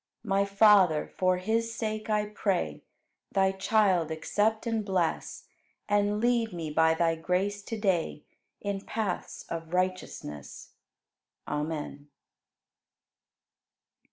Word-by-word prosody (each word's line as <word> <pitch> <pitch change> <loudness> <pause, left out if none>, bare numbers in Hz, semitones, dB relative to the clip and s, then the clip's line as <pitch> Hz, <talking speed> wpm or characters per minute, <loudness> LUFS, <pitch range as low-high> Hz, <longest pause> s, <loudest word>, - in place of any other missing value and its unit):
My 200 -2 +2
Father, 200 -6 +4
for 185 -1 +2
His 225 +4 -1
sake 215 -1 -3
I 210 -1 +2
pray. 205 -3 -1 0.5
Thy 190 -1 +3
child 190 -4 +2
accept 210 +8 0
and 225 -2 0
bless 185 -5 -1 0.4
And 205 0 +2
lead 235 -2 +1
me 165 -3 -4
by 160 +1 +4
Thy 165 0 +2
grace 185 +5 -1
to 225 - -4
day 180 -7 0 0.4
In 200 -1 -2
paths 205 -4 -3
of 165 +1 -5
righteousness. 180 - -3 0.8
Amen. 150 -1 -4
195 Hz, 105 wpm, -29 LUFS, 165-210 Hz, 0.8 s, Father